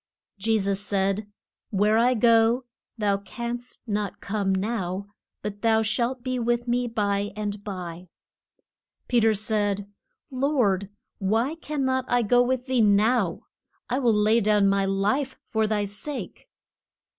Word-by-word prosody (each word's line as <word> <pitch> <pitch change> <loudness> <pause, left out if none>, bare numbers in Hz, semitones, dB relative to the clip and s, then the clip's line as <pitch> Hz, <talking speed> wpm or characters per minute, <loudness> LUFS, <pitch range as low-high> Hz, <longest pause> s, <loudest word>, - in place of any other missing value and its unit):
Je 220 +3 +2
sus 195 -1 0
said, 200 +1 -1 0.4
Where 210 +2 +3
I 250 +2 +4
go 230 +2 +4 0.3
thou 205 -2 +1
canst 235 +4 -5
not 210 -2 -2
come 200 -1 -1
now, 190 -1 -2 0.4
but 205 0 -5
thou 225 -1 +3
shalt 240 +3 -1
be 255 -1 -2
with 240 +1 0
me 245 +1 +1
by 205 -3 0
and 205 -1 -4
by. 180 -3 -6 1.0
Pe 245 - +3
ter 220 -1 +3
said, 205 -2 -1 0.4
Lord, 250 -8 +1 0.3
why 225 +8 +1
can 300 -4 -3
not 260 0 0
I 245 -1 +2
go 245 +3 +4
with 250 0 0
thee 260 -3 +2
now? 210 -2 +3 0.5
I 255 - +1
will 245 -4 +3
lay 215 +2 +3
down 210 -1 +3
my 195 0 +2
life 210 +8 0
for 220 -1 +2
thy 210 -1 0
sake! 205 +9 -5
215 Hz, 145 wpm, -25 LUFS, 200-245 Hz, 1.0 s, I